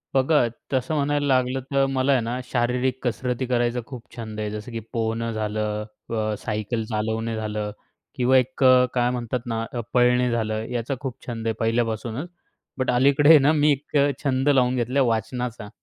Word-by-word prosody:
बघा 135 -1 +4 0.3
तसं 130 +4 0
म्हणायला 145 0 +1
लागलं, 130 -1 +2
तर 135 0 +4
मला 135 +1 +1
आहे 130 -3 +3
ना 120 +2 -3
शारीरिक 125 +1 0
कसरती 125 +1 -1
करायचा 120 0 +1
खूप 125 -4 -8
छंद 110 -2 -6
आहे. 105 -1 -2
जसं 105 +3 -7
की 115 - -4
पोहणं 115 0 -1
झालं, 105 0 -2 0.2
अ, 110 -2 -1
सायकल 110 +1 -2
चालवणे 110 +1 -2
झालं 105 -1 -3 0.4
किंवा 130 +1 +4
एक 130 +1 0
अ, 130 -1 +7
काय 120 -1 +2
म्हणतात 125 0 -2
ना 115 -1 -2 0.3
पळणे 125 0 +4
झालं, 110 -2 -1
याचा 125 +3 -2
खूप 130 -4 -4
छंद 115 -2 -4
आहे 115 - +1
पहिल्यापासूनच. 115 - -1 0.5
बट 130 - +1
अलीकडे 140 +4 +4
आहे 160 - +10
ना, 140 +3 +4
मी 150 -1 +4
एक 145 +1 -1
अ, 140 +1 +4
छंद 135 0 +1
लावून 130 -3 +3
घेतला 125 +3 +1
वाचनाचा. 115 -1 -2
125 Hz, 175 wpm, -24 LUFS, 115-130 Hz, 0.5 s, आहे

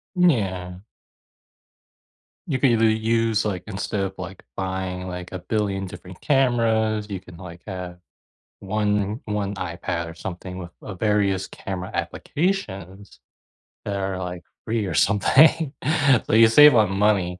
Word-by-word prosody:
Yeah. 95 - +1 1.7
You 135 -5 -1
can 135 -4 +4
either 115 -1 +3
use 110 0 +1
like, 95 -4 -2
instead 100 0 -3
of, 95 0 -3
like, 95 0 -8
buying, 95 -1 -3
like, 90 0 -6
a 95 - -5
billion 100 0 -1
different 90 0 -11
cameras, 115 -6 +2
you 95 -2 -4
can, 90 -2 -14
like, 85 -2 -10
have 90 -2 -6 0.6
one 105 +2 -1
one 105 -2 -2
iPad 85 -2 -4
or - - -8
something 90 +1 -7
with, 85 -1 -8
uh, 100 - -7
various 100 -2 +1
camera 95 -1 -6
applications 100 - -3 0.7
that 100 - -2
are, 95 -1 -2
like, 90 -1 -5 0.2
free 110 -2 -1
or 90 - -3
something, 145 - +4 0.5
so - - -2
you 115 0 +8
save 150 +5 +8
a - - +4
lot 105 -2 +4
of 95 - -3
money, 95 -3 +1
100 Hz, 145 wpm, -23 LUFS, 90-110 Hz, 1.7 s, you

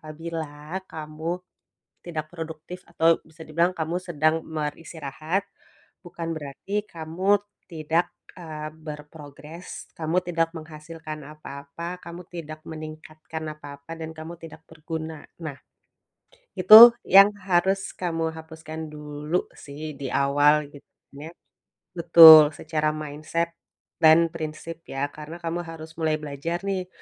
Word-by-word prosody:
apabila 155 +1 -6
kamu 160 +3 -5 0.6
tidak 155 -3 -5
produktif, 165 +2 -8
atau 165 -1 +3
bisa 160 +1 -22
dibilang 170 +3 +1
kamu 165 0 -3
sedang 160 -3 0
beristirahat, 155 +2 -4 0.6
bukan 165 -1 -5
berarti 175 +8 -4
kamu 185 +3 0 0.3
tidak, 165 +3 0 0.3
eee, 155 -3 -7
berprogres, 150 +1 -10
kamu 165 +3 0
tidak 165 -2 -1
menghasilkan 155 -1 -9
apa-apa, 150 +3 -8
kamu 170 +1 -8
tidak 155 -3 -8
meningkatkan 155 0 -8
apa-apa, 145 +1 -9
dan 160 0 -7
kamu 160 +2 -9
tidak 165 -1 -12
berguna. 160 -1 -7 0.2
Nah, 150 -4 -6 1.0
itu 220 +6 +11
yang 195 +2 +8
harus 190 +1 0
kamu 165 -2 -2
hapuskan 160 0 -8
dulu 150 +2 -3
sih, 150 +2 -8
di 135 -2 -4
awal, 145 +2 +3
gitunya. 145 +1 -13 0.6
Betul, 160 -3 +9
secara 155 -1 -1
mindset 155 +3 -3 0.5
dan 165 0 +6
prinsip, 160 +1 -6
ya. 140 +1 -3
Karena, 155 +2 -9
kamu 170 +1 -2
harus 160 -1 -9
mulai 155 -1 +1
belajar 155 +5 -5
nih, 190 -2 -2
160 Hz, 115 wpm, -25 LUFS, 155-170 Hz, 1.0 s, itu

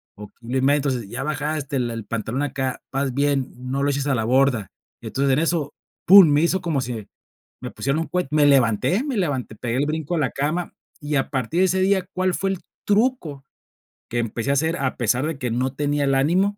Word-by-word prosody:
o 105 0 -9
kilo 120 +2 -3
y 130 - +1
medio, 140 +2 +4
entonces 130 -6 -2
ya 120 +6 -5
bajaste 150 -1 -3
el 120 -2 -1
el 115 -1 -5
pantalón 115 +4 -3
acá, 135 -3 -2
vas 135 -1 -1
bien, 140 -1 0 0.2
no 140 +1 -1
lo 145 - +2
eches 140 0 -2
a 140 - +2
la 115 - -1
borda". 125 -4 +2 0.3
Entonces 140 0 -1
en 135 - +2
eso, 160 -3 -1 0.3
pum, 195 -1 +9
me 145 0 +3
hizo 180 +3 +2
como 160 -6 -1
si 115 -5 -5 0.6
me - - -5
pusieron 140 +3 -1
un 165 - -2
cuet 180 0 -1
me 150 -1 +4
levanté 140 - +3
me 280 -5 -3
levanté, 140 - -2
pegué 120 +1 -3
el 145 - +2
brinco 155 +2 -2
de 165 - +1
la 130 -5 0
cama 160 +5 -2 0.3
y 145 0 -2
a 135 - 0
partir 140 +5 -1
de - - +5
ese 190 +1 +1
día, 190 -1 +2
¿cuál 185 0 +1
fue 195 - -1
el 195 - -2 0.3
truco 205 - 0 0.7
que 120 - -3
empecé 115 +2 -3
a - - +3
hacer 160 +4 +1
a 130 -5 -1
pesar 125 +3 +1
de 160 -3 -4
que 125 -2 -2
no 125 +3 0
tenía 145 +1 -1
el 135 - +1
ánimo? 185 +9 +2
140 Hz, 230 wpm, -22 LUFS, 130-165 Hz, 0.7 s, pum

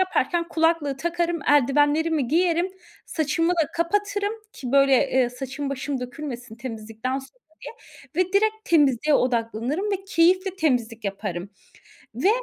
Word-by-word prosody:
yaparken 345 -2 0
kulaklığı 325 -4 +1
takarım, 340 +2 -1
eldivenlerimi 290 +1 +3
giyerim, 345 +3 +2 0.4
saçımı 325 +2 0
da 330 -3 +1
kapatırım 405 +4 0 0.2
ki, 255 -1 -6
böyle, 275 0 +5 0.2
eee, 255 -2 +2
saçım 270 +3 -5
başım 275 0 -3
dökülmesin 245 -3 -7
temizlikten 230 +1 -4
sonra 275 - -13 0.8
diye 365 +3 +3
ve 365 - -14
direkt 430 +2 +3
temizliğe 295 -2 +3
odaklanırım 245 - 0
ve 390 -1 -2
keyifle 370 +1 +2
temizlik 240 - 0
yaparım. 195 -2 -4 0.6
Ve 255 - +1
290 Hz, 125 wpm, -24 LUFS, 250-340 Hz, 0.8 s, böyle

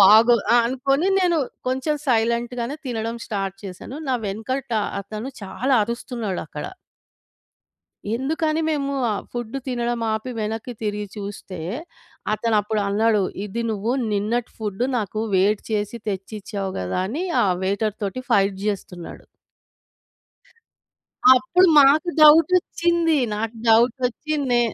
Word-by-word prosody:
బాగో 220 +5 +8 0.2
ఆ! - - +7
అనుకోని 275 +7 +1
నేను 350 -3 +2 0.3
కొంచెం 265 +4 0
సైలెంట్‌గానే 235 +2 0
తినడం 230 -1 -3
స్టార్ట్ 195 -3 -3
చేశాను. 190 +8 -8
నా 255 - +2
వెనకట 235 +6 -4 0.3
అతను 215 +5 -6 0.2
చాలా 255 +7 0
అరుస్తున్నాడక్కడ. 220 - -5 1.5
ఎందుకని 310 +4 0
మేము 280 -3 -1 0.2
ఆహ్, 205 - -2
ఫుడ్ 240 -1 -5
తినడం 240 -2 -1
ఆపి 220 +4 -3
వెనక్కి 220 +3 -3
తిరిగి 210 -1 -2
చూస్తే, 200 -3 -7 0.7
అతను 220 +1 0
అప్పుడు 210 +1 -2
అన్నాడు. 210 +1 +2 0.2
ఇది 210 +3 -3
నువ్వు 220 +2 -1 0.2
నిన్నటి 220 +4 -1
ఫుడ్ 210 +1 -2
నాకు 215 0 -3
వేడి 200 +3 +3
చేసి 210 +2 -2
తెచ్చిచ్చావు 195 0 -4
గదా! 90 - -2
అని 300 - -3 0.2
ఆ - - +2 0.2
వెయిటర్ 200 +2 -1
తోటి 205 +6 -3
ఫైట్ 195 -1 +3
జేస్తున్నాడు. 185 -4 -5 2.1
అప్పుడు 260 +9 +4
మాకు 290 +4 +6
డౌటొచ్చింది. 335 +1 +5 0.2
నాకు 225 +2 -3
డౌట్ 230 +2 +5
ఒచ్చి, 300 +5 -4 0.2
నే 240 0 +4
225 Hz, 115 wpm, -22 LUFS, 205-260 Hz, 2.1 s, బాగో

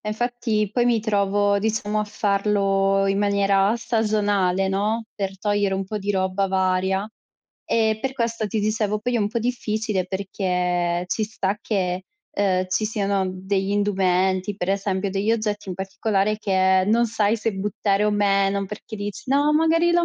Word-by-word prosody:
e 210 - -6
infatti 225 -1 -1
poi 240 +1 +2
mi 235 -2 +3
trovo, 205 -1 +1
diciamo, 215 -1 -1
a - - -1
farlo 200 -2 +1
in 195 0 +1
maniera 200 +1 +2
stagionale, 205 -5 +1
no, 210 +4 0
per 195 -2 -4
togliere 205 -1 0
un 195 0 -2
po' 210 +2 -4
di 205 +1 -2
roba 190 0 0
varia. 190 +1 0 0.6
Ehm, 220 -1 +1
per 265 +3 -2
questo, 230 -3 -2
ti 220 - -2
dicevo 215 0 0
poi 245 +3 -2
è - - +1
un 205 -1 +1
po' 235 +2 -2
difficile 220 -4 -1
perché 180 -2 -1
ci 220 - -1
sta 205 -2 -2
che, 185 -4 -2 0.3
ehm, 185 -2 +1
ci 185 +4 0
siano 200 -3 0
degli 190 +1 -2
indumenti, 190 -1 +1
per 185 -1 -2
esempio 195 0 -1
degli 200 +3 0
oggetti 210 -3 -2
in 185 - -3
particolare, 195 +2 -1
che 190 -2 +3
non 235 +2 +3
sai 220 -1 +1
se 225 0 -2
buttare 200 +1 -1
o 210 - +2
meno, 200 -1 +1
perché 210 +2 -8
dici: 205 -2 -6
"No, 290 +2 +3
magari 330 +2 +3
lo 345 0 +3
205 Hz, 170 wpm, -23 LUFS, 195-215 Hz, 0.6 s, mi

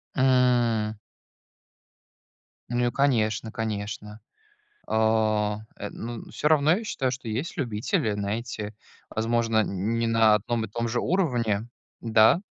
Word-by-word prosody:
М. 125 -4 +3 1.8
Ну, 120 0 +1
и - - 0
конечно, 115 -5 +1
конечно. 105 -1 -4 0.7
А, 110 -1 +2 0.2
э, 105 - -5
н - - -10 0.3
ну, - - -15
всё - - -1
равно, 155 0 +4
я 225 - -5
считаю, 135 -11 -1
что 125 -2 -6
есть 130 +13 -3
любители, 110 -4 0
знаете, 105 +1 -4 0.3
возможно, 115 0 +1
не 110 +5 -1
на 115 -1 +5
одном 115 +2 -1
и - - -11
том 115 +3 -3
же 120 +1 -1
уровне. 120 - 0 0.3
Да? 110 +8 +5
115 Hz, 125 wpm, -26 LUFS, 110-120 Hz, 1.8 s, на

